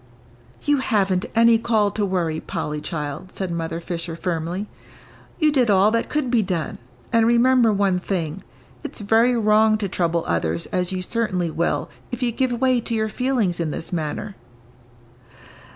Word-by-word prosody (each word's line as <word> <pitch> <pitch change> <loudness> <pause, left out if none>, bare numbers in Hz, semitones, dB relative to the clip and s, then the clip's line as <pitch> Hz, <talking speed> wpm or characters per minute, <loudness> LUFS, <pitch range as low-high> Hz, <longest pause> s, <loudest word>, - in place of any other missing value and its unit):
"You 290 -1 +3
haven't 195 -7 +1
any 230 0 +5
call 220 -3 +2
to 210 +1 -2
worry, 175 -5 -1
Polly, 150 0 -4
child," 150 +2 -5
said 190 -2 -4
Mother 165 0 -3
Fisher, 170 -1 -5
firmly. 175 +2 -3 0.7
"You 310 -2 +3
did 255 -6 +2
all 200 +1 +5
that 230 0 0
could 295 -5 -1
be 240 -3 +4
done 180 -6 -3 0.3
and 230 -1 +4
remember 240 0 +4
one 195 -3 +1
thing, 170 -5 -3 0.4
it's - - -6
very 225 +4 +3
wrong 215 0 +4
to 210 -2 -2
trouble 170 -2 0
others 85 0 -1
as 180 0 -1
you 185 -1 -3
certainly 185 -6 -1
will 170 +2 -1 0.2
if 245 0 -3
you 240 - +1
give 255 +2 0
way 250 0 +2
to 230 0 -2
your 220 0 0
feelings 235 -8 0
in 165 -2 -1
this 160 - -4
manner." 175 +5 -3
200 Hz, 165 wpm, -22 LUFS, 170-230 Hz, 0.7 s, any